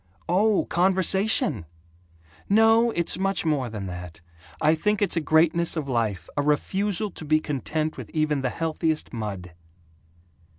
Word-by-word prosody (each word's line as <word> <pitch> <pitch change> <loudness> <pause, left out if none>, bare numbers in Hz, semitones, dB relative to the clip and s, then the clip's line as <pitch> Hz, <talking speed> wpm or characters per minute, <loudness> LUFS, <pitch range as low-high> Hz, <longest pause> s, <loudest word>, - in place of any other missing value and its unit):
"Oh, 200 +4 +2
conversation! 185 - +2 0.8
No, 225 +3 +5
it's 170 -4 -1
much 195 -2 0
more 140 -6 0
than 105 -3 -6
that. 90 -3 -8 0.4
I 155 - +3
think 210 +6 0
it's 205 - +1
a 165 - +1
greatness 165 +2 +2
of 150 -3 -3
life 110 - -2
a 145 - +1
refusal 195 +8 -1
to 160 - -9
be 155 +1 +2
content 155 +2 -3
with - - -8
even 155 -3 0
the 130 - 0
healthiest 160 +1 -2
mud." 100 -6 -6
160 Hz, 140 wpm, -25 LUFS, 130-190 Hz, 0.8 s, No